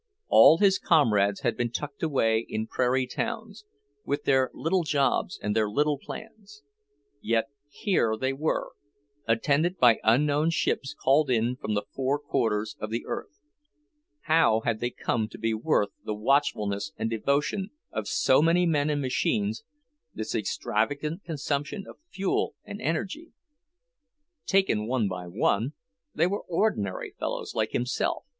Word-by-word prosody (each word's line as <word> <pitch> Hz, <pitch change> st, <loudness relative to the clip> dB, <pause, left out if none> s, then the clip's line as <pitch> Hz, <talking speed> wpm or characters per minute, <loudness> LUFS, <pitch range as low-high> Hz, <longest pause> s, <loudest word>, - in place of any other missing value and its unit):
All 160 Hz, -, +8 dB
his 195 Hz, 0 st, +4 dB
comrades 105 Hz, -, +3 dB
had 120 Hz, -, 0 dB
been 120 Hz, -1 st, -1 dB
tucked 140 Hz, +4 st, -6 dB
away 115 Hz, -8 st, +2 dB
in 110 Hz, 0 st, -2 dB
prairie 130 Hz, +2 st, +1 dB
towns, 210 Hz, -, -5 dB, 0.4 s
with 145 Hz, +1 st, -2 dB
their 130 Hz, -1 st, +3 dB
little 180 Hz, +4 st, 0 dB
jobs 150 Hz, +4 st, 0 dB
and 105 Hz, 0 st, -1 dB
their 110 Hz, -2 st, +2 dB
little 145 Hz, +5 st, +1 dB
plans. 220 Hz, -, -11 dB, 0.6 s
Yet 115 Hz, +3 st, 0 dB, 0.2 s
here 145 Hz, -, 0 dB
they 130 Hz, +1 st, 0 dB
were, 150 Hz, +4 st, -1 dB, 0.6 s
attended 145 Hz, +10 st, +1 dB
by 120 Hz, -6 st, +5 dB
unknown 145 Hz, +7 st, +3 dB
ships 140 Hz, -4 st, -1 dB
called 140 Hz, +2 st, +3 dB
in 120 Hz, 0 st, +1 dB
from 110 Hz, -4 st, -3 dB
the 105 Hz, -, 0 dB
four 135 Hz, +2 st, 0 dB
quarters 110 Hz, -7 st, -1 dB
of 110 Hz, -, -4 dB
the 115 Hz, +2 st, -3 dB
earth. -, -, -6 dB, 0.8 s
How 155 Hz, -9 st, +3 dB
had 110 Hz, -1 st, -1 dB
they 120 Hz, -, -1 dB
come 110 Hz, -2 st, -2 dB
to -, -, -11 dB
be 115 Hz, 0 st, -1 dB
worth 110 Hz, -3 st, +1 dB
the 105 Hz, -, -3 dB
watchfulness 105 Hz, -5 st, 0 dB
and -, -, -1 dB
devotion 145 Hz, -, 0 dB, 0.2 s
of 110 Hz, -3 st, -4 dB
so 130 Hz, -, +3 dB
many 170 Hz, +3 st, +3 dB
men 150 Hz, -3 st, +1 dB
and 145 Hz, -1 st, 0 dB
machines, 110 Hz, -4 st, 0 dB, 0.5 s
this 110 Hz, 0 st, -4 dB
extravagant 145 Hz, -, -1 dB
consumption 150 Hz, +4 st, -3 dB
of -, -, -12 dB
fuel 195 Hz, -, -1 dB
and 205 Hz, -, -8 dB
energy? 195 Hz, -, -3 dB, 1.1 s
Taken 190 Hz, -, +2 dB
one 120 Hz, -4 st, +1 dB
by 90 Hz, -1 st, -5 dB
one, 110 Hz, -, 0 dB, 0.4 s
they 160 Hz, -, +3 dB
were 200 Hz, +3 st, -1 dB
ordinary 165 Hz, -, -1 dB
fellows -, -, -3 dB
like -, -, 0 dB
himself. 125 Hz, +1 st, -1 dB
135 Hz, 145 wpm, -27 LUFS, 110-160 Hz, 1.1 s, All